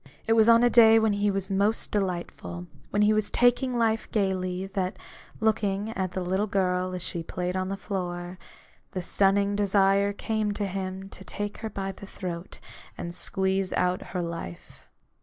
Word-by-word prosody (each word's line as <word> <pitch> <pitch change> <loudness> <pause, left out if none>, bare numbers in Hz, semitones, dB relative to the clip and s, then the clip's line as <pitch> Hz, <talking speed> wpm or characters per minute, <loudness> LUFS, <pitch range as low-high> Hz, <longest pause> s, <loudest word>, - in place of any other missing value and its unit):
It 225 - +3
was 225 0 +5
on 230 +1 +7
a 245 - +6
day 225 -1 +8
when 220 -1 +3
he 205 0 +1
was 195 0 -2
most 200 +3 +1
delightful, 180 -2 -3 0.2
when 205 - +2
he 210 +1 +5
was 215 -1 0
taking 245 +1 +3
life 225 -1 +1
gaily, 185 -2 0
that, 190 -1 -3 0.4
looking 210 -1 0
at 190 -4 -3
the 185 - -2
little 190 +4 0
girl 185 -2 0
as 180 - -4
she 170 - -2
played 180 +2 -3
on 185 0 -1
the 195 - -3
floor, 180 -3 -4 0.5
the 185 -2 -3
stunning 200 +2 +2
desire 200 0 +3
came 215 0 -1
to 205 0 -2
him 190 0 -4
to 190 - -11
take 205 +2 -5
her 220 - -4
by 195 -1 -4
the 195 +1 -11
throat 180 -2 -6 0.4
and 170 - -5
squeeze 190 +1 0
out 180 0 +1
her 180 -2 -3
life. 165 - -8
195 Hz, 175 wpm, -27 LUFS, 185-210 Hz, 0.5 s, day